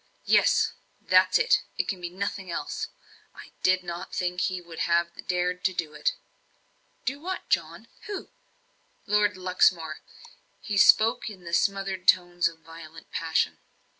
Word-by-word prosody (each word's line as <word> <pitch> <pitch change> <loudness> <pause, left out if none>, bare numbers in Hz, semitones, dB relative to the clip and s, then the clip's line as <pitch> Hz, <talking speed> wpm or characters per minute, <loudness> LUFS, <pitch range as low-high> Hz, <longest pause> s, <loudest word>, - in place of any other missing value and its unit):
"Yes - - +4 0.3
that's - - +4
it 460 +1 +3 0.2
it - - 0
can 190 -3 -3
be 175 - -4
nothing 195 0 -4
else! 170 - -3 0.5
I - - -12
did 185 0 +3
not 175 +1 -6
think 180 0 -1
he 185 -1 -1
would 170 -2 -11
have 170 0 0
dared 180 0 -1
to 190 - +2
do 160 -3 -3
it." - - 0 0.9
"Do 275 +3 -2
what, 370 +4 -5
John? - - -1 0.2
Who?" 405 -3 -6 0.7
"Lord 205 -2 +2
Luxmore." 180 -3 +1 0.6
He 205 -2 -1
spoke 220 +4 +5
in 190 -4 -12
the 170 0 -8
smothered 195 0 0
tones 175 -1 +4
of 165 -1 -9
violent 165 -1 -13
passion. 165 -1 0
180 Hz, 145 wpm, -27 LUFS, 170-200 Hz, 0.9 s, spoke